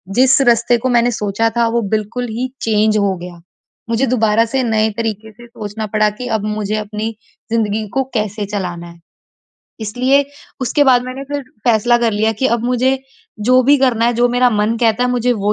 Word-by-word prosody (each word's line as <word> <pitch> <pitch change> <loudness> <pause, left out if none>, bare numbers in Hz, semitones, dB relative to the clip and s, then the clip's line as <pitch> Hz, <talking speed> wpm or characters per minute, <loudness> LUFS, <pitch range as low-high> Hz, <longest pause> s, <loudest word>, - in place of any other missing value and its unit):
जिस 260 +2 +5
रस्ते 235 +1 +3
को 255 +3 -2
मैंने 240 +1 +3
सोचा 210 +1 0
था 235 -1 +3
वो 235 - +2
बिल्कुल 220 +4 -2
ही 240 +4 -2
चेंज 215 -1 +2
हो 200 -2 +1
गया। 175 0 -10 0.5
मुझे 230 +3 +1
दोबारा 225 -2 +2
से 260 +3 -1
नए 220 -2 +1
तरीके 220 -1 -3
से 240 +3 -15
सोचना 215 -2 -6
पड़ा 215 0 +3
कि 250 - -4
अब 205 - -7
मुझे 215 0 -2
अपनी 215 +1 -4 0.4
ज़िंदगी 215 -1 0
को 270 - +1
कैसे 210 -2 -2
चलाना 180 -4 -5
है? 170 0 -14 0.8
इसलिए 255 +6 +2 0.4
उसके 260 +4 +2
बाद 250 -3 +4
मैंने 255 +2 -6
फिर 285 +1 -4 0.2
फ़ैसला 240 0 +3
कर 235 -2 +1
लिया 220 +2 +1
कि 265 - +3
अब 235 0 -3
मुझे 255 +2 +1 0.5
जो 255 0 +5
भी 285 +3 +5
करना 250 -4 +2
है 240 - +2
जो 240 +1 +2
मेरा 245 +1 +3
मन 215 +1 0
कहता 230 +1 +2
है, 250 - 0
मुझे 245 0 +1
वो 210 -2 0
230 Hz, 195 wpm, -17 LUFS, 215-245 Hz, 0.8 s, जिस